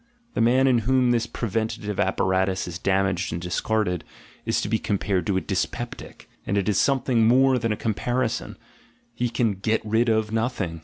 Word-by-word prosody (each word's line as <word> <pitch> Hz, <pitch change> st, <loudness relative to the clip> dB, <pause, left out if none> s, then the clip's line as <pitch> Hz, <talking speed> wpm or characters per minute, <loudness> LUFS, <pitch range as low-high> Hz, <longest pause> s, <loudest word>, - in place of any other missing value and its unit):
The -, -, 0 dB
man 125 Hz, +3 st, +4 dB
in 125 Hz, -3 st, +4 dB
whom 125 Hz, +2 st, +2 dB
this 115 Hz, -1 st, +1 dB
preventative 110 Hz, -2 st, -3 dB
apparatus 95 Hz, 0 st, +1 dB
is 90 Hz, +1 st, -6 dB
damaged 95 Hz, -1 st, 0 dB
and 85 Hz, -, -3 dB
discarded, 90 Hz, +1 st, -1 dB, 0.4 s
is -, -, +1 dB
to -, -, -3 dB
be 110 Hz, +1 st, 0 dB
compared 95 Hz, -3 st, -1 dB
to 95 Hz, -, +1 dB
a -, -, 0 dB
dyspeptic, 105 Hz, +5 st, -4 dB, 0.2 s
and 100 Hz, -, -1 dB
it 100 Hz, -, 0 dB
is 105 Hz, -, +2 dB
something 125 Hz, -4 st, +2 dB
more 130 Hz, +2 st, +4 dB
than 115 Hz, -1 st, -1 dB
a 105 Hz, -, -1 dB
comparison 120 Hz, +2 st, -2 dB, 0.3 s
— 120 Hz, -, -36 dB
he 120 Hz, 0 st, -1 dB
can 115 Hz, -2 st, +1 dB
"get 110 Hz, +3 st, 0 dB
rid 110 Hz, +2 st, +2 dB
of" 110 Hz, -1 st, +1 dB
nothing. 110 Hz, -8 st, -2 dB
110 Hz, 185 wpm, -24 LUFS, 95-120 Hz, 0.4 s, man